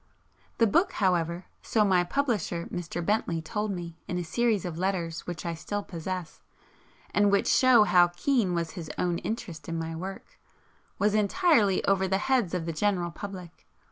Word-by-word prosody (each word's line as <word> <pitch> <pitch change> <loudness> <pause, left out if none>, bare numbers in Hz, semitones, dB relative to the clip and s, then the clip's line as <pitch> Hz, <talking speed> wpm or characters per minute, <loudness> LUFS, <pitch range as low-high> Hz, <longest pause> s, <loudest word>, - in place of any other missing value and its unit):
The 230 - +5
book, 335 - +2
however, 175 -2 0 0.2
so 215 -2 +2
my 185 -3 +3
publisher 205 - -1
Mr. 175 -1 -4
Bentley 190 -5 0
told 210 +7 -3
me 170 -3 -6
in 180 - -2
a 175 - -2
series 220 +2 0
of 170 -2 -5
letters 175 -4 -2
which 175 -2 -5
I 170 - -1
still 205 +5 -4
possess, 180 -1 -6 0.7
and 205 -1 +4
which 200 - +2
show 255 -4 +6
how 180 -4 +5
keen 190 +1 0
was 170 -1 -2
his 170 -4 -7
own 175 -1 0
interest 185 -8 -5
in 165 - -2
my 165 0 -4
work, 190 +4 -8 0.6
was 205 +1 +2
'entirely 215 - +3
over 190 -1 +2
the 190 +1 +1
heads 230 -5 +1
of 170 -3 -2
the 165 - -3
general 180 0 0
public.' 185 -3 -9
185 Hz, 175 wpm, -28 LUFS, 170-210 Hz, 0.7 s, show